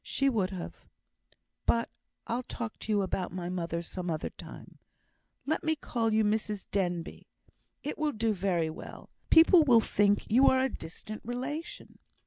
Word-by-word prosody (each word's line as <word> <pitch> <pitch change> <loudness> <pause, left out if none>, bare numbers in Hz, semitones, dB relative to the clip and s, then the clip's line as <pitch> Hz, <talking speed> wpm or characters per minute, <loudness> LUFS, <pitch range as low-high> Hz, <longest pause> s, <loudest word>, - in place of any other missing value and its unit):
"She 275 0 +1
would 205 -7 +1
have 185 -2 -6 0.9
But 230 0 +3 0.4
I'll 235 +2 -1
talk 235 -2 -6
to 220 - -4
you 205 -2 +3
about 185 -1 -2
my 175 -1 -4
mother 170 -2 -3
some 180 +1 -5
other 155 -2 -2
time. - - -12 0.7
Let 315 +4 -1
me 315 -1 +1
call 230 -6 -1
you 220 0 +3
Mrs 210 -1 -1
Denbigh. 175 -4 -2 0.6
It 295 - -4
will 305 -1 +1
do 225 -3 0
very 175 -4 0
well, 160 - -9
too. - - -25 0.2
People 330 +1 +7
will 245 -6 +6
think 205 -2 +2
you 250 +5 +5
are 260 - +5
a 265 +1 +2
distant 210 +3 -8
relation." 260 +8 -5
215 Hz, 165 wpm, -30 LUFS, 185-255 Hz, 0.9 s, People